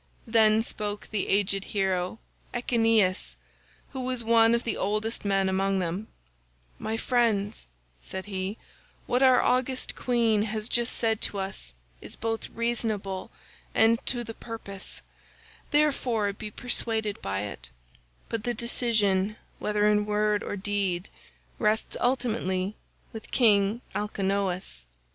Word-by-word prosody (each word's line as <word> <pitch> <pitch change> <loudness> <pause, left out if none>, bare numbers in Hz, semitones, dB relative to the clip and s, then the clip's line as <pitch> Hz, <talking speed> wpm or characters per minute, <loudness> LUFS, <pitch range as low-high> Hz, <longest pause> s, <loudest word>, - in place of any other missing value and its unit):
Then 220 -1 +4
spoke 210 -2 -4
the 210 -3 -1
aged 195 -1 +2
hero 190 -1 -1 0.4
Echeneus 225 -5 +2 0.6
who 265 - -5
was 255 -2 -2
one 230 0 +5
of 235 - -1
the 230 - -1
oldest 215 +3 -1
men 195 -1 +2
among 195 +1 +1
them, 185 +4 -2 0.7
"My 220 +1 -2
friends," 225 -4 +1 0.3
said 190 - -6
he, 195 +1 -3 0.5
"what 250 +1 +1
our 260 -2 +7
august 255 +1 +1
queen 230 -4 +2
has 215 0 -2
just 240 0 0
said 225 -2 +1
to 205 - -1
us 190 - -5 0.3
is - - -9
both 225 0 -3
reasonable 220 -5 -2 0.5
and 225 +1 +4
to 240 -1 0
the 225 -1 -7
purpose, 220 -4 -8 0.7
therefore 255 -9 +2
be 210 +1 -6
persuaded 220 -2 -1
by 95 0 -2
it; 105 -9 -7 0.6
but 230 -2 -3
the 240 0 -1
decision 215 -4 +2 0.2
whether 210 0 +1
in 210 0 +3
word 210 0 +2
or - - -3
deed 195 -2 -1 0.5
rests 215 0 +1
ultimately 215 -6 0 0.4
with 220 -1 -8
King 210 -1 +4
Alcinous." 195 - -2
215 Hz, 125 wpm, -27 LUFS, 195-230 Hz, 0.7 s, our